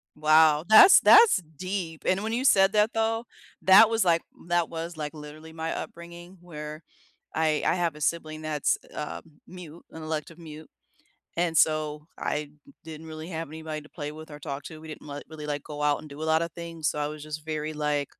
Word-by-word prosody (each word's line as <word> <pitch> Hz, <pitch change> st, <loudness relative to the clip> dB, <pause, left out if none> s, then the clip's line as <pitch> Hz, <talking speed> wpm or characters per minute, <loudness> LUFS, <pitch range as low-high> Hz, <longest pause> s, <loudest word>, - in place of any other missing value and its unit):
Wow. 155 Hz, 0 st, +4 dB
That's 220 Hz, -, +9 dB
that's 455 Hz, -, +7 dB, 0.2 s
deep, 185 Hz, -2 st, -4 dB
and 190 Hz, +2 st, +1 dB
when 220 Hz, +1 st, -2 dB
you 245 Hz, +3 st, -1 dB
said 195 Hz, -6 st, +5 dB
that, 210 Hz, +1 st, +2 dB
though, 225 Hz, +1 st, 0 dB, 0.4 s
that 195 Hz, +4 st, +7 dB
was, 225 Hz, -2 st, +1 dB
like 170 Hz, -1 st, +3 dB, 0.3 s
that 175 Hz, -1 st, +1 dB
was, 165 Hz, 0 st, -6 dB
like, 150 Hz, 0 st, -5 dB
literally 155 Hz, +1 st, -11 dB
my 160 Hz, 0 st, -4 dB
upbringing 170 Hz, +2 st, -9 dB
where 150 Hz, -3 st, -8 dB, 0.5 s
I 155 Hz, -1 st, +1 dB
I -, -, +2 dB
have 170 Hz, -3 st, -1 dB
a 150 Hz, -, -12 dB
sibling 155 Hz, 0 st, -2 dB
that's, 155 Hz, -2 st, 0 dB, 0.2 s
um, 150 Hz, -, -5 dB, 0.3 s
mute, 175 Hz, -2 st, -11 dB
an 160 Hz, -, -9 dB
elective 155 Hz, +1 st, -5 dB
mute. 155 Hz, -1 st, -11 dB, 0.7 s
And 170 Hz, -1 st, 0 dB
so 150 Hz, -1 st, +1 dB
I 150 Hz, -1 st, -3 dB, 0.3 s
didn't 160 Hz, 0 st, -10 dB
really 155 Hz, +1 st, -8 dB
have 165 Hz, -2 st, -5 dB
anybody 155 Hz, 0 st, -6 dB
to 150 Hz, -, -17 dB
play 150 Hz, -3 st, -6 dB
with 155 Hz, +1 st, -11 dB
or 150 Hz, -, -9 dB
talk 140 Hz, -1 st, -5 dB
to. 155 Hz, +1 st, -10 dB
We 160 Hz, -, -11 dB
didn't 155 Hz, -1 st, -10 dB
let 145 Hz, 0 st, -7 dB
really, 155 Hz, -1 st, -8 dB
like, 145 Hz, -1 st, -3 dB
go 150 Hz, 0 st, -7 dB
out 150 Hz, -1 st, +2 dB
and -, -, -11 dB
do 145 Hz, +2 st, -10 dB
a -, -, -3 dB
lotta 160 Hz, +1 st, +1 dB
things. 165 Hz, -2 st, -5 dB
So 150 Hz, -, -4 dB
I 145 Hz, -, -1 dB
was 150 Hz, 0 st, -8 dB
just 155 Hz, 0 st, -7 dB
very 155 Hz, 0 st, -3 dB
like 150 Hz, -1 st, -1 dB
160 Hz, 205 wpm, -26 LUFS, 150-170 Hz, 0.7 s, That's